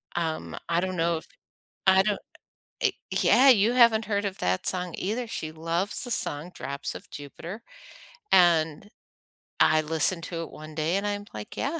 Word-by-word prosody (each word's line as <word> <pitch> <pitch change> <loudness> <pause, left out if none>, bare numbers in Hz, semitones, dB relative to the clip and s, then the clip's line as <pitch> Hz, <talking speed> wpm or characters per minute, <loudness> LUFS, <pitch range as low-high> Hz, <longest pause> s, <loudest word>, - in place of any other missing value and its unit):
Um, 160 -2 -3
I 170 0 +2
don't 185 0 -2
know 165 0 +1
if - - -11 0.6
I 190 0 +6
don't 210 -1 0 0.6
eh, - - +3 0.3
yeah, 270 +1 +6
you 225 0 +5
haven't 230 -3 +5
heard 205 -1 -1
of 195 -1 -3
that 90 +1 0
song 180 -2 -1
either. 225 +5 -2
She 155 -7 -5
loves 165 +5 -2
the 245 - -5
song 155 -3 -1
Drops 140 +2 -5
of - - -10
Jupiter, 165 - -9 0.7
and 170 +1 +3 0.7
I 155 0 +5
listened 165 +2 +1
to 165 -1 -4
it - - -10
one 155 0 -11
day 160 +3 0
and 205 +1 -2
I'm 205 0 -3
like, 105 -1 -8
"Yeah, 315 +4 -2
175 Hz, 175 wpm, -26 LUFS, 155-205 Hz, 0.7 s, I